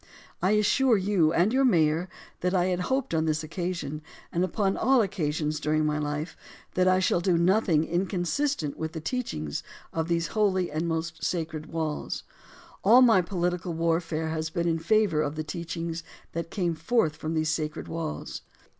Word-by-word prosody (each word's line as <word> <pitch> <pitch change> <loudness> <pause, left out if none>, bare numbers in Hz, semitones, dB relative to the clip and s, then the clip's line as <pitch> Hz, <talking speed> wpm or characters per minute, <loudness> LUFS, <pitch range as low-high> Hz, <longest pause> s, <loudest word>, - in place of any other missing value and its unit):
I 185 +4 +3
assure 225 +3 +4
you 185 -5 +2
and 175 +7 +2
your 270 +1 +3
mayor 170 -6 +3 0.3
that 180 +1 0
I 180 -1 +3
had 180 - -2
hoped 265 -3 0
on 160 -1 +2
this 155 0 0
occasion, 170 -2 -4 0.3
and 175 - +1
upon 195 +1 0
all 265 0 +3
occasions 155 -5 -1
during 155 +1 +1
my 150 0 0
life, 150 +2 -3 0.4
that 185 0 +2
I 185 0 +5
shall 185 -2 +2
do 175 -1 +2
nothing 175 -2 +3
inconsistent 180 - -1
with 160 0 -4
the 160 - -4
teachings 155 - -3 0.3
of 160 0 -1
these 170 -1 0
holy 190 -5 +1
and 155 +3 -1
most 165 0 -3
sacred 160 -3 -2
walls. 160 -2 -3 0.6
All 240 +6 +7
my 225 -6 +6
political 175 -1 -2
warfare 165 -1 0
has 160 0 -2
been 170 +1 -1
in 165 -1 +1
favor 190 -2 +2
of 145 0 -2
the 155 - -3
teachings 165 +1 -4 0.3
that 165 0 -4
came 175 -4 -1
forth 160 0 +1
from 155 +2 -4
these 155 0 +1
sacred 155 -1 -2
walls. 120 - -5
170 Hz, 170 wpm, -27 LUFS, 155-185 Hz, 0.6 s, All